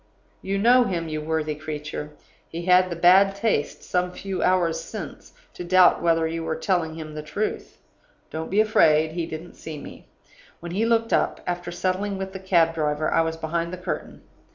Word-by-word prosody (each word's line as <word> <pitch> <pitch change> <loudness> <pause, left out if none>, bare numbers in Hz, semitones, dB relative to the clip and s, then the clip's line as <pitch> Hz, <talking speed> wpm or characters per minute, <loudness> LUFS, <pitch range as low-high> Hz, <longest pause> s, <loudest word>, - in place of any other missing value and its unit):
You 195 +1 -2
know 245 +4 +5
him, 170 -6 -2
you 155 0 -3
worthy 155 0 -1
creature; 150 -1 -6 0.4
he 170 +1 -6
had 185 0 +5
the 170 - -3
bad 190 +4 +5
taste, 200 -8 -1
some 180 0 -1
few 195 0 -4
hours 180 -3 +2
since, - - -8 0.2
to - - -7
doubt 185 +1 +5
whether 165 -1 +2
you 165 0 -4
were 160 0 -2
telling 160 -1 -1
him 155 -1 -8
the 150 - -5
truth. 200 +8 -4 0.5
Don't 160 +1 -5
be 200 - +1
afraid, 160 -8 +4
he 165 0 -3
didn't 165 +2 -8
see 155 -2 -8
me. - - -11 0.5
When 170 0 -7
he 215 +6 0
looked 230 0 +1
up, - - +1
after 175 0 -3
settling 190 +3 -2
with 190 0 -5
the 190 - -6
cab 170 -3 +3
driver, 155 -1 -1
I - - +4
was 160 0 -2
behind 165 +1 -2
the 185 - -5
curtain. 180 - -6
170 Hz, 190 wpm, -24 LUFS, 160-190 Hz, 0.5 s, know